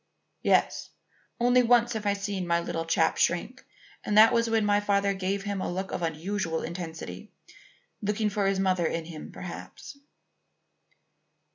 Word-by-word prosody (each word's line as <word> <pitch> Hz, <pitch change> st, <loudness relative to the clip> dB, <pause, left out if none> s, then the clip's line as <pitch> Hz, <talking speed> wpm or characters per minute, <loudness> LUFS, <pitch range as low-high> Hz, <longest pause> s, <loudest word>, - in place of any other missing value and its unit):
"Yes. -, -, +1 dB, 0.5 s
Only 245 Hz, +1 st, +4 dB
once 240 Hz, 0 st, +3 dB
have 215 Hz, -2 st, -3 dB
I 200 Hz, -, +3 dB
seen 200 Hz, -2 st, -3 dB
my 170 Hz, 0 st, +2 dB
little 165 Hz, -1 st, -3 dB
chap 165 Hz, -, +2 dB
shrink, -, -, 0 dB, 0.4 s
and 210 Hz, -, 0 dB
that 220 Hz, +1 st, +8 dB
was 230 Hz, -1 st, +2 dB
when 225 Hz, -1 st, +2 dB
my 205 Hz, 0 st, +3 dB
father 200 Hz, -1 st, +1 dB
gave 195 Hz, +1 st, -2 dB
him 200 Hz, -2 st, -3 dB
a -, -, -2 dB
look 190 Hz, +2 st, -4 dB
of -, -, -3 dB
unusual 165 Hz, +1 st, -2 dB
intensity, 160 Hz, -, -7 dB, 0.7 s
looking 210 Hz, +1 st, 0 dB
for 200 Hz, -1 st, 0 dB
his 195 Hz, -1 st, +1 dB
mother 185 Hz, -3 st, +2 dB
in 165 Hz, 0 st, -3 dB
him 160 Hz, -2 st, -9 dB
perhaps." 280 Hz, -, -9 dB
200 Hz, 155 wpm, -27 LUFS, 170-210 Hz, 0.7 s, that